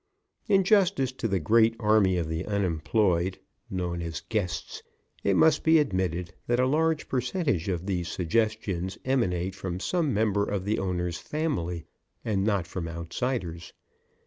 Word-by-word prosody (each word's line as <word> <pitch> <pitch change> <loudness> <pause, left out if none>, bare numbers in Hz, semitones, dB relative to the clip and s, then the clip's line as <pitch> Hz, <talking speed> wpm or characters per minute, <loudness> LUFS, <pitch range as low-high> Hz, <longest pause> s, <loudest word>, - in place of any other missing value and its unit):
In 195 -3 +4
justice 185 - +3
to 130 -2 -3
the 95 -3 0
Great 115 +7 +4
Army 105 -4 +3
of 85 -3 -1
the 80 +1 -2
Unemployed 95 -1 +1 0.3
known 90 -2 -2
as 85 -1 -4
"guests" 100 -7 -2 0.4
it 100 - +2
must 160 - +4
be 160 0 +6
admitted 90 - 0
that 120 +1 +2
a 130 - +4
large 155 +3 +1
percentage 125 - -1
of 90 -1 -2
these 90 -4 -1
suggestions 95 0 -1
emanate 95 -9 0
from 95 -2 -5
some 165 - 0
member 105 -2 +2
of 100 -2 -2
the 105 +2 0
owner's 90 -2 -2
family 110 - -2 0.4
and 100 -3 +1
not 100 -4 +1
from 85 0 -5
outsiders. 85 +1 -4
100 Hz, 145 wpm, -27 LUFS, 90-120 Hz, 0.4 s, be